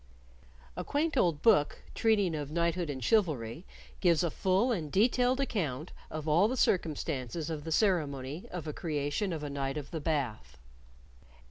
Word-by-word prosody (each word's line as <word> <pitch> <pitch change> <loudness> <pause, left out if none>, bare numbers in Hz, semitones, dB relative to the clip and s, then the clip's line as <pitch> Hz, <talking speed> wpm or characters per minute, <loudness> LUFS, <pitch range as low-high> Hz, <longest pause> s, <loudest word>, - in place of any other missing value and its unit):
A - - -3
quaint 300 +2 0
old 170 - +2
book 150 -10 +4
treating 205 -6 +2
of 145 -2 -3
knighthood 170 +1 0
and 130 -3 -4
chivalry 155 - +1 0.3
gives 175 -2 +3
a 170 - 0
full 190 - +2
and 160 -10 -2
detailed 250 +5 +3
account 165 - -2 0.2
of 155 0 -5
all 170 +7 +4
the 255 +3 -2
circumstances 155 - 0
of 150 -1 -5
the 165 - -4
ceremony 155 -6 0
of 180 -3 -6
a 150 - -3
creation 150 +5 -2
of 160 -3 -4
a 145 - -3
Knight 135 0 -2
of 145 -2 -6
the 160 -3 -4
Bath. 120 - -2
160 Hz, 160 wpm, -31 LUFS, 145-190 Hz, 0.3 s, book